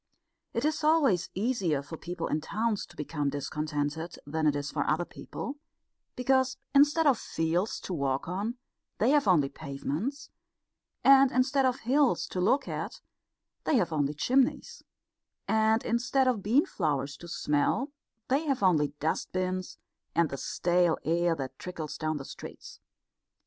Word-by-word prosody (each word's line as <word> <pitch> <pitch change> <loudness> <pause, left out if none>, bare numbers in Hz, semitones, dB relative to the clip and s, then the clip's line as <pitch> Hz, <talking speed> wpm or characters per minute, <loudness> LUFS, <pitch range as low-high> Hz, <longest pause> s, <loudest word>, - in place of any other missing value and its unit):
It 235 +4 -1
is 310 0 0
always 285 - +3
easier 190 - 0
for 150 +4 -8
people 175 +2 -5
in 155 - -1
towns 215 +4 -1
to 175 - -17
become 150 -1 -2
discontented 150 +2 -3
than 155 +2 0
it 145 - +3
is 145 0 -3
for 145 - 0
other 160 +3 +1
people, 280 +10 -7 0.6
because 260 +1 +2 0.2
instead 295 +3 +5
of 270 -5 +4
fields 165 +6 -1
to 185 - -5
walk 140 -4 -1
on 205 +7 -3 0.4
they 230 +5 +3
have 290 -6 +3
only 160 -7 +4
pavements; 155 - -4 0.7
and 275 -1 +7
instead 265 +1 +3
of 255 0 -1
hills 270 +3 +2
to 180 - -2
look 245 +10 +2
at - - -4 0.7
they 310 - +2
have 175 -9 +1
only 145 -1 0
chimneys; 255 - +1 0.7
and 220 +1 +2
instead 250 +3 +1
of 245 -5 +1
bean 235 +10 +3
flowers 140 -2 -1
to 170 - -11
smell 170 - 0 0.4
they 285 +5 +1
have 270 -7 0
only 150 -6 +3
dust 160 +2 -1
bins 185 0 -2 0.4
and 170 -2 +3
the 140 - -3
stale 175 +3 +1
air 170 +1 +2
that 135 -2 -6
trickles 165 -4 -6
down 155 0 -1
the 135 - -7
streets. - - -10
180 Hz, 155 wpm, -29 LUFS, 155-255 Hz, 0.7 s, and